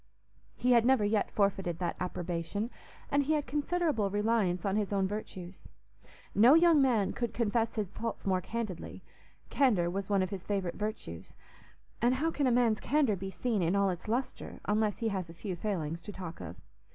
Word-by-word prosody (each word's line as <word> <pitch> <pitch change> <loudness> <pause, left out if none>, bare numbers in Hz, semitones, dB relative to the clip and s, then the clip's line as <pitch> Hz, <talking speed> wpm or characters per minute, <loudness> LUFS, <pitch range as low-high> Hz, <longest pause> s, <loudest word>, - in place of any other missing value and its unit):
He 250 - +1
had 235 -2 +6
never 250 -3 +4
yet 210 0 +1
forfeited 195 -4 0
that 175 -1 -2
approbation, 180 +4 -3 0.4
and 285 - +4
he 290 +3 +1
had 295 -2 0
considerable 295 - 0
reliance 205 -3 +1
on 195 0 +1
his 210 -2 0
own 195 -1 +1
virtues. 190 -3 -7 0.7
No 240 +8 +7
young 330 -3 +6
man 235 -7 +2
could 235 -2 -3
confess 230 0 0
his 205 -4 -2
faults 230 -1 -5
more 185 -2 +1
candidly; 215 -3 -5 0.5
candour 200 -11 +3
was 195 +1 -3
one 200 -2 +3
of 185 - -4
his 190 -3 -5
favourite 195 -4 -2
virtues; 210 - -6 0.7
and 245 +2 +3
how 320 +5 0
can 285 -4 0
a - - +3
man's 235 -3 +3
candour 275 -6 +2
be 190 +1 -5
seen 220 +1 -1
in 170 +3 +1
all 200 -1 +3
its 180 +2 -7
lustre 245 +5 -3
unless 210 0 +1
he 230 - -1
has 190 -4 -3
a 165 - -11
few 190 0 -4
failings 170 -4 -3
to 205 - -8
talk 180 -4 -7
of? - - -7
210 Hz, 190 wpm, -31 LUFS, 185-240 Hz, 0.7 s, No